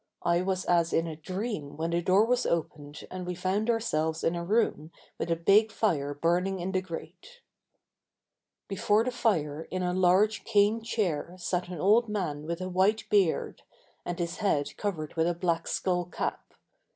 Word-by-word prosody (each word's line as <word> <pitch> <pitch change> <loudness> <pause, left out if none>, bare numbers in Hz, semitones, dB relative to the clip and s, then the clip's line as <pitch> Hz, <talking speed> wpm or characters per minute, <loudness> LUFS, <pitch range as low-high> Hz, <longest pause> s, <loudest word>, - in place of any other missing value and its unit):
I 170 0 +2
was 185 0 -1
as 170 -1 +2
in 165 - +2
a 160 -2 -5
dream 175 -3 -5
when 165 +1 -2
the 170 +1 +1
door 190 +5 +4
was 250 +1 +1
opened 150 -3 -3
and 185 0 -5
we 180 0 -4
found 190 +5 -1
ourselves 160 -9 0
in 165 - +2
a 170 - -3
room 175 -5 0 0.3
with - - -2
a 165 - +2
big 200 +6 +4
fire 145 -11 0
burning 180 +5 +1
in 180 +2 -3
the 185 -1 0
grate. 190 - -9 1.3
Before 205 +2 +2
the 255 - -1
fire 160 -11 0
in 185 0 -2
a 180 0 0
large 185 +4 +3
cane 210 +2 +3
chair 180 -7 -2
sat 180 0 -2
an 180 -3 -7
old 215 +6 +4
man 155 -8 -3
with 170 +2 -3
a 185 - -3
white 190 +4 +2
beard, 195 -6 +2 0.4
and 175 - -4
his 170 -1 -3
head 155 -9 0
covered 170 -7 -3
with 165 0 +2
a 175 - 0
black 170 -1 -1
skull 180 -1 0
cap. 175 - -5
180 Hz, 180 wpm, -28 LUFS, 165-205 Hz, 1.3 s, door